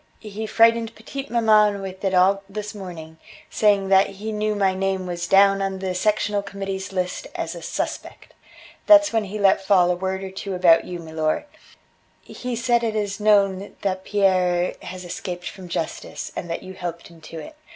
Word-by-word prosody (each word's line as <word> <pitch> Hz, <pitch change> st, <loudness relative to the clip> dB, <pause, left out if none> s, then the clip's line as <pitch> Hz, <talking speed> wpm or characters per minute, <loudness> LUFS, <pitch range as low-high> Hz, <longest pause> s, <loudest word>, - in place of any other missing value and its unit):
"He 215 Hz, 0 st, -6 dB
frightened 230 Hz, 0 st, +3 dB
petite 270 Hz, +5 st, -7 dB
maman 215 Hz, -3 st, +4 dB
with 190 Hz, 0 st, -8 dB
it 190 Hz, -1 st, +1 dB
all 195 Hz, +2 st, +4 dB
this 210 Hz, +1 st, -6 dB
morning, 165 Hz, -5 st, -9 dB, 0.3 s
saying 200 Hz, -2 st, +2 dB
that 195 Hz, 0 st, +5 dB
he 205 Hz, +3 st, -6 dB
knew 215 Hz, 0 st, -1 dB
my 195 Hz, -2 st, +2 dB
name 190 Hz, 0 st, -1 dB
was 175 Hz, -1 st, -4 dB
down 195 Hz, +1 st, +5 dB
on 195 Hz, 0 st, -2 dB
the 190 Hz, -1 st, -3 dB
Sectional 205 Hz, +1 st, 0 dB
Committee's 195 Hz, -1 st, -5 dB
list 180 Hz, -1 st, -3 dB
as 165 Hz, +1 st, -3 dB
a 170 Hz, -, -9 dB
'suspect.' -, -, -5 dB, 0.5 s
That's 305 Hz, -4 st, +7 dB
when 220 Hz, -2 st, +1 dB
he 205 Hz, +2 st, -6 dB
let 195 Hz, -1 st, +3 dB
fall 185 Hz, -2 st, +4 dB
a -, -, +1 dB
word 190 Hz, +1 st, -3 dB
or 190 Hz, -, -6 dB
two 190 Hz, 0 st, -5 dB
about 175 Hz, -2 st, +5 dB
you, 180 Hz, -, -6 dB
milor. 160 Hz, -, -2 dB, 0.8 s
He 250 Hz, -1 st, -5 dB
said 235 Hz, 0 st, +1 dB
it 220 Hz, -1 st, -1 dB
is 205 Hz, -2 st, -2 dB
known 200 Hz, -2 st, +2 dB
that 190 Hz, -1 st, -1 dB
Pierre 185 Hz, -3 st, +2 dB
has 185 Hz, 0 st, -8 dB
escaped 175 Hz, 0 st, -6 dB
from 180 Hz, +1 st, -9 dB
justice, 165 Hz, -2 st, -4 dB
and 175 Hz, -, -5 dB
that 165 Hz, -, -4 dB
you 190 Hz, -, -9 dB
helped 170 Hz, -2 st, -6 dB
him 170 Hz, -1 st, -17 dB
to 160 Hz, +1 st, -10 dB
it. 310 Hz, -, -9 dB
195 Hz, 185 wpm, -23 LUFS, 180-210 Hz, 0.8 s, That's